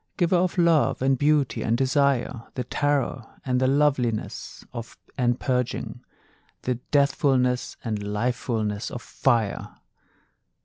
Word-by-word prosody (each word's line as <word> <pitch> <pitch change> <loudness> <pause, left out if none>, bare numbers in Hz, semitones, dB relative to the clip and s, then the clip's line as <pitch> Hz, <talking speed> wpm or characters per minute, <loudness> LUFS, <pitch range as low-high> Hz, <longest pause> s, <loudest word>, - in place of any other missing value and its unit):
Giver 180 0 +3
of 180 +1 0
Love, 165 -6 +3
and 135 0 +4
Beauty, 145 -3 +2
and 115 +1 +1
Desire, 135 -3 +1
The 125 - -2
terror, 135 -3 -1
and 125 -1 +1
the 130 - +3
loveliness, 135 -5 0 0.5
and 120 -1 +1
purging, 125 -2 -2 0.6
The 125 -1 -1
deathfulness 135 -3 +2
and 110 -2 -1
lifefulness 105 0 -2
of 120 - -7
fire! 115 -6 0
130 Hz, 115 wpm, -25 LUFS, 120-140 Hz, 0.6 s, and